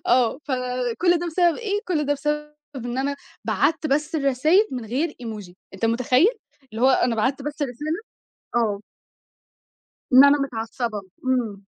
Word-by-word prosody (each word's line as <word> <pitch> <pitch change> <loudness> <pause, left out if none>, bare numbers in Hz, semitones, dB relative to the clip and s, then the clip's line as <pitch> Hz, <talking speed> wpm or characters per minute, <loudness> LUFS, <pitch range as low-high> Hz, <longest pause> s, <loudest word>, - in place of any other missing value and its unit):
آه. 245 0 +3
فكل 255 +6 0
ده 345 - -3
بسبب 345 0 +2
إيه؟ 415 -3 -2
كل 300 -5 0
ده 290 - +2
بسبب 300 +1 -2 0.2
إن 245 0 -4
أنا 280 +1 -1 0.3
بَعتّ 320 -1 +1
بس 300 +3 0
الرسايل 305 - +3
من 250 -3 -4
غير 265 +10 -1
Emoji 210 -6 -7 0.2
أنت 195 +4 -4
متخيل؟ 250 - +3 0.4
اللي 225 +3 -4
هو 260 - +6
أنا 245 -2 +2
بَعتّ 265 +5 0
بس 295 +1 -4
الرسالة 295 - -3 0.6
آه. 215 -4 +1 1.3
إن 260 +2 +9
أنا 285 +1 +6
متعصبة، 230 -4 -3 0.2
إمم. 235 -6 -1
265 Hz, 150 wpm, -23 LUFS, 240-300 Hz, 1.3 s, إن